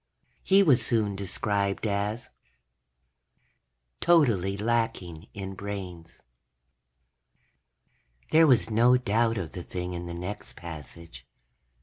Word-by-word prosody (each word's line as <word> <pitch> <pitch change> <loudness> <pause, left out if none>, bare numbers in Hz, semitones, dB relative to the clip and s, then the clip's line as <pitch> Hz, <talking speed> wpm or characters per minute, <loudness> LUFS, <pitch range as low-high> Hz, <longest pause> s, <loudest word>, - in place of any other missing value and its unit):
He 195 +1 +5
was 130 -9 +4
soon 110 -4 0
described 100 +1 -1
as:... 105 +2 -2 1.7
totally 115 - +3
lacking 110 -7 -2
in 95 -1 -6
brains. 95 -4 -7 2.1
There 160 +1 +6
was 125 -4 +3
no 120 +3 +5
doubt 115 -1 +1
of 85 -5 -4
the 90 - -7
thing 90 +1 -5
in 85 0 -6
the 85 - -6
next 90 +4 -7
passage. 80 -4 -10
100 Hz, 100 wpm, -27 LUFS, 90-115 Hz, 2.1 s, There